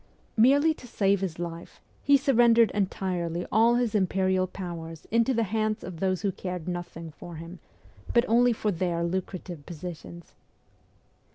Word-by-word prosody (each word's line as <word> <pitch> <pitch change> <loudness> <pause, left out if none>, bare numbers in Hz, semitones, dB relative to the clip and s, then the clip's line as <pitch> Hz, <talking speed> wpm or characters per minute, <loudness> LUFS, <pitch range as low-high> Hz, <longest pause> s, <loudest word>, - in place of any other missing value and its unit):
Merely 280 +7 +5
to 250 - -13
save 200 -3 +1
his 180 -4 -3
life, 170 0 -7 0.2
he 280 0 +5
surrendered 235 -4 +4
entirely 180 -4 -2
all 230 +3 +5
his 240 -2 0
imperial 190 -2 +1
powers 170 -4 -7
into 230 +3 +3
the 230 -2 +1
hands 215 +1 -1
of 180 -3 -7
those 185 0 0
who 200 - +1
cared 180 -2 -6
nothing 175 -2 -5
for 170 +2 -10
him, 165 +3 -9 0.5
but 235 +1 +4
only 240 +2 +4
for 215 -2 -1
their 170 -1 -1
lucrative 175 -2 -4
positions. 170 0 -9
190 Hz, 150 wpm, -27 LUFS, 170-225 Hz, 0.5 s, Merely